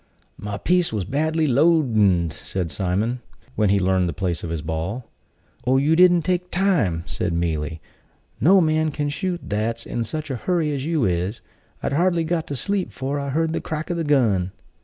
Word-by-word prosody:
"My 105 Hz, -1 st, -4 dB
piece 180 Hz, +7 st, +1 dB
was 105 Hz, -4 st, -2 dB
badly 155 Hz, -, 0 dB
loadned," 120 Hz, -, +3 dB
said 90 Hz, -4 st, -4 dB
Simon, 100 Hz, +10 st, -1 dB, 0.3 s
when 105 Hz, -2 st, +2 dB
he 100 Hz, -, +4 dB
learned 95 Hz, -1 st, +2 dB
the -, -, -3 dB
place 90 Hz, -3 st, -2 dB
of 85 Hz, -, -4 dB
his 80 Hz, -2 st, -3 dB
ball. 80 Hz, +10 st, -4 dB, 0.6 s
"Oh, 130 Hz, +1 st, +4 dB
you 150 Hz, +4 st, +3 dB
didn't 175 Hz, -1 st, +5 dB
take 180 Hz, 0 st, -1 dB
time," 155 Hz, -, +1 dB
said -, -, -3 dB
Mealy. 80 Hz, -2 st, -2 dB, 0.6 s
"No 190 Hz, +5 st, +6 dB
man 155 Hz, -1 st, +2 dB
can 145 Hz, 0 st, -2 dB
shoot 175 Hz, +5 st, -2 dB
that's 115 Hz, +3 st, -2 dB
in 120 Hz, -, -2 dB
such 150 Hz, +6 st, -4 dB
a 130 Hz, -, -2 dB
hurry 165 Hz, +2 st, 0 dB
as 140 Hz, +1 st, -3 dB
you 160 Hz, -7 st, +1 dB
is. 90 Hz, +5 st, -1 dB, 0.4 s
I'd -, -, -1 dB
hardly 170 Hz, +2 st, +2 dB
got 165 Hz, 0 st, -1 dB
to 145 Hz, -, -4 dB
sleep 200 Hz, +7 st, -1 dB
'fore 135 Hz, +2 st, -3 dB
I 140 Hz, 0 st, -3 dB
heard 160 Hz, +3 st, 0 dB
the -, -, -2 dB
crack 155 Hz, +2 st, -4 dB
o' -, -, +1 dB
the 170 Hz, -1 st, -2 dB
gun." 110 Hz, -, +2 dB
135 Hz, 190 wpm, -23 LUFS, -, 0.6 s, No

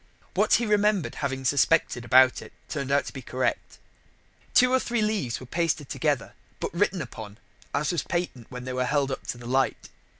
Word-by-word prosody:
What -, -, +4 dB
he 235 Hz, -, +1 dB
remembered 210 Hz, -3 st, +2 dB
having 135 Hz, -2 st, -2 dB
suspected 140 Hz, -2 st, +2 dB
about 130 Hz, +2 st, +5 dB
it -, -, -12 dB
turned 140 Hz, -3 st, -4 dB
out 140 Hz, -1 st, +3 dB
to -, -, -7 dB
be 135 Hz, -, -7 dB
correct. 130 Hz, +1 st, -2 dB, 0.8 s
Two 250 Hz, 0 st, +6 dB
or 260 Hz, -, +5 dB
three 235 Hz, -3 st, -1 dB
leaves 205 Hz, -, -1 dB
were 130 Hz, -, -10 dB
pasted 160 Hz, 0 st, -1 dB
together, -, -, -1 dB, 0.3 s
but -, -, -4 dB
written 180 Hz, -1 st, +1 dB
upon, 110 Hz, -4 st, -9 dB, 0.3 s
as 145 Hz, +4 st, 0 dB
was 170 Hz, -5 st, 0 dB
patent 170 Hz, -10 st, -3 dB
when 125 Hz, 0 st, -7 dB
they 130 Hz, 0 st, -4 dB
were 125 Hz, 0 st, 0 dB
held 140 Hz, +1 st, +1 dB
up 130 Hz, -, -5 dB
to -, -, -3 dB
the 120 Hz, -, -11 dB
light. 130 Hz, +2 st, 0 dB
140 Hz, 195 wpm, -26 LUFS, 130-175 Hz, 0.8 s, Two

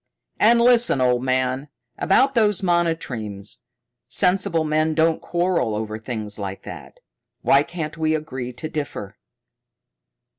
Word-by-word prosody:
"And 235 Hz, +2 st, +5 dB
listen, 235 Hz, -, +5 dB
old 125 Hz, -1 st, +2 dB
man. 130 Hz, +2 st, 0 dB, 0.3 s
About 265 Hz, +8 st, +3 dB
those 210 Hz, -4 st, +2 dB
monotremes 135 Hz, -, -2 dB, 0.5 s
sensible 180 Hz, -3 st, +2 dB
men 155 Hz, +1 st, +1 dB
don't 160 Hz, 0 st, +2 dB
quarrel 175 Hz, -10 st, 0 dB
over 110 Hz, 0 st, -4 dB
things 110 Hz, -3 st, -5 dB
like 95 Hz, -1 st, -6 dB
that. -, -, -10 dB, 0.4 s
Why 140 Hz, -, +5 dB
can't 160 Hz, 0 st, -6 dB
we 155 Hz, 0 st, +1 dB
agree 135 Hz, -5 st, -5 dB
to 125 Hz, +6 st, -6 dB
differ?" 145 Hz, -10 st, -6 dB
155 Hz, 120 wpm, -22 LUFS, 125-175 Hz, 0.5 s, And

